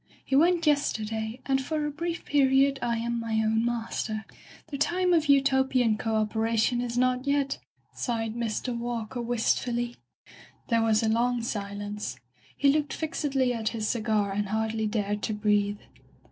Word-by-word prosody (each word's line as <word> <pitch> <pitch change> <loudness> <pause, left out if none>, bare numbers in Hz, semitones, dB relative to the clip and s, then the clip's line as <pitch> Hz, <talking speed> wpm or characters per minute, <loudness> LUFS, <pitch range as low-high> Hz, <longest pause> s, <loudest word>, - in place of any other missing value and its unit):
He 270 - 0
went 335 +3 +4
yesterday, 225 -5 0
and 270 0 +1
for 305 +1 -2
a 295 - -2
brief 335 +3 -4
period 275 -1 +3
I 235 -1 0
am 235 +1 -2
my 230 -1 -3
own 220 +1 +2
master. 230 -2 -2 0.4
The 280 - -5
time 360 +4 +2
of 320 -3 +3
Utopian 265 -4 +3
co 220 0 -2
operation 220 +2 +1
is 240 -1 -3
not 255 +1 +1
yet,'* 280 -1 +1 0.3
sighed 225 -3 -2
Mr. 235 +1 -2
Walker 235 0 -3
wistfully. 240 0 0 0.7
There 230 -1 +3
was 225 -1 +3
a - - +2
long 235 +2 +1
silence. 205 -1 -4 0.4
He 280 - +4
looked 295 0 +1
fixedly 280 -5 0
at 225 -2 -1
his 215 -1 -1
cigar 215 -3 0
and 205 +1 -1
hardly 220 +1 -1
dared 210 -1 -1
to 215 - -2
breathe. 205 -1 +1
235 Hz, 155 wpm, -27 LUFS, 220-270 Hz, 0.7 s, went